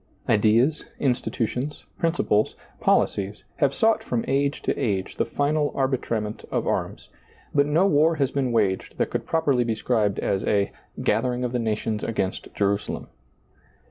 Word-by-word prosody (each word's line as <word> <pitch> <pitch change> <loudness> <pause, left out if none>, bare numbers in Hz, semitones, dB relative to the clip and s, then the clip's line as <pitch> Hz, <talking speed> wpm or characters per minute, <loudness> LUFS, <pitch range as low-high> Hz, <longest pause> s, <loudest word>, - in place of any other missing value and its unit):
Ideas, 115 +8 +3 0.2
institutions, 125 +1 -1
principles, 160 -11 +1 0.2
policies, 100 +1 +1
have 140 -4 +3
sought 220 +10 +2
from 120 -2 -1
age 140 +1 0
to - - 0
age 95 -4 -2
the - - +1
final 145 +1 +1
arbitrament 120 -5 -1
of - - -1
arms; - - -2 0.4
but 140 -1 +3
no 160 +6 +3
war 160 -2 +4
has 140 -3 +1
been 135 -3 0
waged 100 -5 0
that - - 0
could - - -3
properly 145 -6 +2
be 115 -2 -1
described 110 -3 +1
as 95 - 0
a 100 -1 +1
" - - -11
gathering 125 +3 +1
of 125 - -1
the 125 - -1
nations 110 -1 -1
against 100 -4 -2
Jerusalem." 100 0 -1
125 Hz, 150 wpm, -25 LUFS, 105-145 Hz, 0.4 s, war